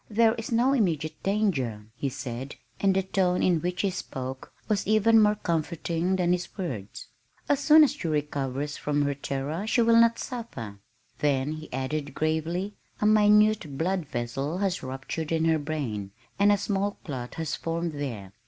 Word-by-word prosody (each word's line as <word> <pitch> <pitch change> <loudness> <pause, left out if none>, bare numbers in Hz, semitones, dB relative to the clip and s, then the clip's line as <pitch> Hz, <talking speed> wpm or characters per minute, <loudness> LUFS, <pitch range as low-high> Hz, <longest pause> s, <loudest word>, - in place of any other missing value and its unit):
"There 220 +1 +4
is 225 0 -6
no 245 +4 +3
immediate 160 - 0
danger," 150 - 0
he 140 - -2
said, 130 0 -6 0.2
and 195 -1 +3
the 190 - +2
tone 185 -1 +1
in 175 -4 +3
which 180 +1 -1
he 195 - +1
spoke 130 -6 -6 0.2
was 205 -4 0
even 220 +1 +5
more 210 0 +4
comforting 170 0 -1
than 180 -2 +1
his 180 +3 -2
words. 125 - -5 0.4
"As 285 -2 +2
soon 305 +2 +7
as 295 - +4
she 170 - -5
recovers 145 -2 -2
from 145 0 0
her 140 0 0
terror 140 +7 -3
she 235 +1 +3
will 230 0 +6
not 230 0 +4
suffer" 115 - -6 0.4
then 140 -1 +1
he 155 0 -7
added 140 +2 -3
gravely, 160 +6 -1 0.3
"A - - 0
minute 210 -7 +4
blood 180 0 -1
vessel 135 +5 -3
has 195 -1 -1
ruptured 135 +5 -5
in 165 0 +1
her 160 -1 +3
brain, 125 -10 -4 0.3
and 205 +1 +5
a 205 - +4
small 200 +1 -1
clot 130 -8 -6
has 160 -1 -2
formed 165 0 -2
there. 120 -10 -5
165 Hz, 170 wpm, -27 LUFS, 140-205 Hz, 0.4 s, soon